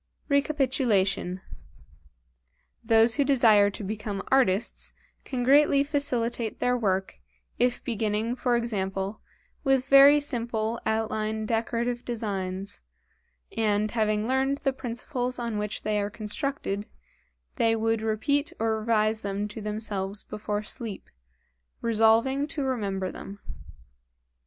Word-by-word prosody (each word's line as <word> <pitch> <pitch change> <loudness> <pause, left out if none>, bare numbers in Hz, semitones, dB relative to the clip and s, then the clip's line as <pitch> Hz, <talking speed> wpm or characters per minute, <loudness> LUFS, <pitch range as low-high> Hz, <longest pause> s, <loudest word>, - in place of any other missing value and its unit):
Recapitulation. 255 - +1 1.4
Those 225 0 +4
who 285 - +4
desire 225 -7 +5
to 205 - -7
become 205 -1 -4
artists, 235 -6 +2 0.3
can 255 -3 -2
greatly 280 +1 +5
facilitate 245 -6 -1
their 250 0 +1
work, 195 -5 -1 0.4
if 245 0 +1
beginning 220 0 -1
for 245 -1 +1
example 195 -3 -2 0.4
with 270 -2 +2
very 275 +2 +8
simple 235 -5 -1
outline 220 0 -1
decorative 235 +2 -1
designs, 195 - -4 0.7
and 210 -1 +1
having 215 -1 0
learned 265 +2 +1
the 270 - +1
principles 250 0 -4
on 235 -3 -3
which 210 0 -4
they 210 0 0
are 200 - -2
constructed, 215 -1 -3 0.7
they 225 0 +3
would 225 0 0
repeat 280 +9 0
or 220 -1 0
revise 215 0 +1
them 200 0 -2
to 215 +1 -7
themselves 210 -2 -2
before 210 0 -4
sleep, 220 -2 -6 0.7
resolving 230 +5 +3
to 290 -1 -2
remember 200 -8 -2
them. 200 - -9
225 Hz, 115 wpm, -27 LUFS, 210-250 Hz, 1.4 s, very